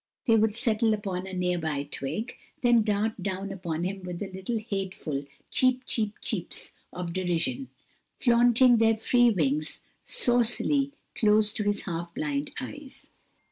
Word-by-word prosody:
They 225 - +5
would 220 -1 +3
settle 225 -1 +2
upon 190 -3 -4
a 190 - -7
near 180 -1 0
by 155 -3 -2
twig, 150 - -4 0.3
then 240 -1 +5
dart 210 0 0
down 195 +1 -3
upon 170 -4 -3
him 190 +2 -3
with 180 -1 -6
little 190 +3 -3
hateful 190 -9 -4 0.3
"cheep, 255 0 +3
cheep, 215 -4 0
cheeps" 205 -8 -2 0.2
of 175 -1 -5
derision, 185 +9 -1 0.5
flaunting 240 0 +5
their 225 0 +4
free 245 +2 +4
wings 155 -6 0 0.2
saucily 245 +4 +2 0.2
close 210 -1 +4
to - - -2
his 205 0 0
half 170 -1 -4
blind 290 0 -2
eyes. 285 +1 -8
210 Hz, 140 wpm, -27 LUFS, 180-240 Hz, 0.5 s, They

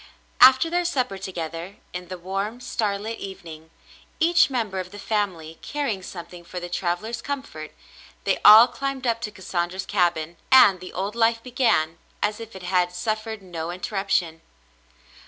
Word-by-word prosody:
After 260 +4 +8
their 350 +2 0
supper 255 - -1
to 190 0 -6
gether, 170 +2 -6 0.2
in 180 0 -6
the 185 - -6
warm, 195 +6 -4
starlit 220 -2 -3
evening, 165 -5 -9 0.5
each 335 0 +4
member 220 -7 -2
of 185 0 -5
the 205 - -11
family 185 -7 -3
carrying 280 -10 -3
something 175 -1 -9
for 180 +1 -7
the 175 0 -7
traveller's 180 +6 -2
comfort, 270 - -6 0.5
they - - +1
all 220 +3 +10
climbed 270 +1 -4
up 230 -1 0
to 210 - -4
Cassandra's 185 -1 -3
cabin, 175 -4 0
and 205 -8 +7
the 180 - -9
old 195 +3 -3
life 230 0 +2
began 235 -11 +1 0.2
as 210 +1 -1
if 225 -2 -10
it 190 - -9
had 180 -1 +1
suffered 215 +3 -3
no 170 -3 -5
interruption. 180 -3 -1
195 Hz, 155 wpm, -24 LUFS, 175-230 Hz, 0.5 s, all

